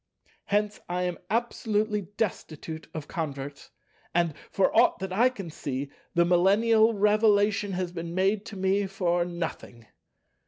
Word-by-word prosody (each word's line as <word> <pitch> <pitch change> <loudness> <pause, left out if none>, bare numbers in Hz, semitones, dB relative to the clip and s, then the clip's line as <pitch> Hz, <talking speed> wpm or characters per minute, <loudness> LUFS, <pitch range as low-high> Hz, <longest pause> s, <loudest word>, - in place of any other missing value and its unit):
Hence 210 +1 0
I 180 +1 -1
am 180 -1 -2
absolutely 215 -3 0
destitute 160 -6 -4
of 155 -2 -6
converts, 140 -4 -5 0.5
and, 170 -2 +2 0.2
for 195 - +1
aught 235 +2 +5
that 190 -1 -5
I 240 +6 +4
can 195 -10 -8
see, 140 -1 -4 0.2
the 170 0 +5
millennial 215 +6 +4
Revelation 205 -1 +3
has 180 -1 -2
been 170 -1 -6
made 195 +2 +2
to 205 - -8
me 190 +1 +1
for 175 -2 0
nothing. 165 -9 -6
190 Hz, 135 wpm, -27 LUFS, 170-210 Hz, 0.5 s, aught